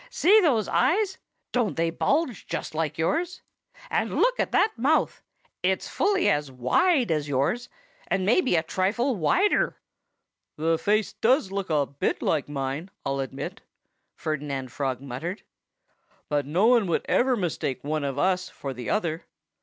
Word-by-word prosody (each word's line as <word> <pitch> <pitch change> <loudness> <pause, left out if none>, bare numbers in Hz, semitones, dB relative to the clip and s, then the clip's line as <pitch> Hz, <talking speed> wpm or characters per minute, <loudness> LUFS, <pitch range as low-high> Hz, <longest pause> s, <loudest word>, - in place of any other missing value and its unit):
"See 435 -3 +5
those 245 - +2
eyes 390 +2 +1 0.3
don't 240 -6 0
they 165 0 +1
bulge 270 - 0
just - - -4
like 155 -1 -2
yours? 325 - -1 0.5
And - - 0
look - - +2
at - - 0
that 435 - +3
mouth! 280 +7 +1 0.4
It's - - 0
fully 400 -3 +1
as 145 -2 +1
wide 235 - +2
as 150 -2 -1
yours 145 - 0 0.4
and 185 - 0
maybe 240 - +3
a 160 - +2
trifle 215 +10 0
wider!" 360 - +2 0.8
"The 160 +1 +1
face 210 0 +1
does 240 -4 +2
look 195 -2 -3
a 150 -3 +2
bit 140 +1 -2
like 150 -3 0
mine, 140 +5 -3 0.2
I'll 135 0 -1
admit," 135 -1 -5 0.5
Ferdinand 145 -4 -4
Frog 130 -2 -2
muttered. 140 - -5 0.9
"But 145 -2 0
no 175 +8 +2
one 235 -4 +4
could 170 - 0
ever 255 0 +2
mistake 165 - -2
one 150 +1 -2
of 140 -1 -3
us 185 +3 +1
for 135 -1 -6
the 125 -1 -6
other. 170 -5 -1
175 Hz, 155 wpm, -26 LUFS, -, 0.9 s, See